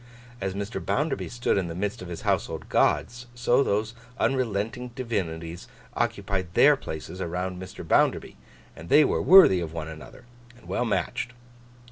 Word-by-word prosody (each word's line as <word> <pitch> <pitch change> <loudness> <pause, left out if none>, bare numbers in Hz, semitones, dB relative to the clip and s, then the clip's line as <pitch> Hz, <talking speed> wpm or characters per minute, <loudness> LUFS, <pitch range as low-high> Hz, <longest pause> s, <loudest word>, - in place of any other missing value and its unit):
As 95 0 -2
Mr. 100 +3 -4
Bounderby 150 +1 -1
stood 120 -4 0
in 90 - -2
the 85 - -6
midst 100 +3 -3
of 90 - -7
his 85 -1 -7
household - - -1
gods, 120 +1 +1
so 120 +2 +3
those 110 -3 0 0.3
unrelenting 125 -1 -1
divinities 85 -9 -4 0.3
occupied 95 -3 -2
their 145 +1 +7
places 90 - -7
around 90 +2 -3
Mr. 95 - -9
Bounderby, - - +2 0.4
and 85 - -11
they 150 0 +7
were - - 0
worthy 185 - +8
of 80 -2 -5
one 80 -1 -5
another, 80 - -11 0.3
and - - -18
well 120 - -1
matched. 120 +2 -2
100 Hz, 155 wpm, -26 LUFS, 85-120 Hz, 0.4 s, worthy